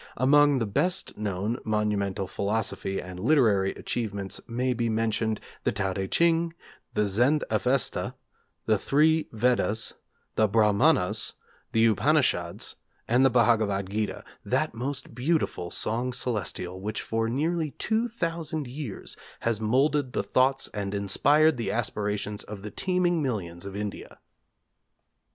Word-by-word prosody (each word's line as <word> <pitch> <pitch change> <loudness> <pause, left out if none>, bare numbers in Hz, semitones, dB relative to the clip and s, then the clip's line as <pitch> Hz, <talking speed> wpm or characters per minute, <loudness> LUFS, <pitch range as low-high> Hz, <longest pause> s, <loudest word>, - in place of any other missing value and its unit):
Among 145 +2 +5
the 115 - 0
best 155 - -1
known 105 +3 -2
monumental 105 -3 0
philosophical 100 0 -2
and 90 -1 -8
literary 110 -6 +3
achievements 100 -4 -3
maybe 120 0 0
mentioned 110 0 0 0.2
the - - +2
Tao 95 -2 -1
Teh 95 0 -3
C'hing; 165 - +2 0.4
the 105 - +2
Zend 120 +10 +2
Avesta; 130 0 +1 0.5
the 110 -2 +2
Three 155 +5 +3
Vedas; 115 -1 +1 0.4
the 110 - +4
Brahmanas; 105 - +3 0.4
the 115 0 +4
Upanishads; 115 - +1 0.3
and 125 +3 +4
the 135 - +6
Bhagavad 110 -5 +2
gita, 105 0 -2 0.2
that - - 0
most 130 +5 -5
beautiful 130 - -1
'Song 120 +7 -1
Celestial' 95 -6 -2
which 105 +2 -3
for 115 0 -1
nearly 155 +5 0
two 220 - -1
thousand 165 -8 -3
years 125 -4 -6 0.3
has 115 -2 0
moulded 130 +4 +2
the - - 0
thoughts 135 +1 +2
and 100 -1 -3
inspired 145 +10 +3
the 115 - -2
aspirations 105 -3 -2
of 100 -1 -9
the 105 - -6
teeming 180 - +1
millions 95 - -3
of 100 - -7
India. 105 0 -6
115 Hz, 130 wpm, -27 LUFS, 100-140 Hz, 0.5 s, the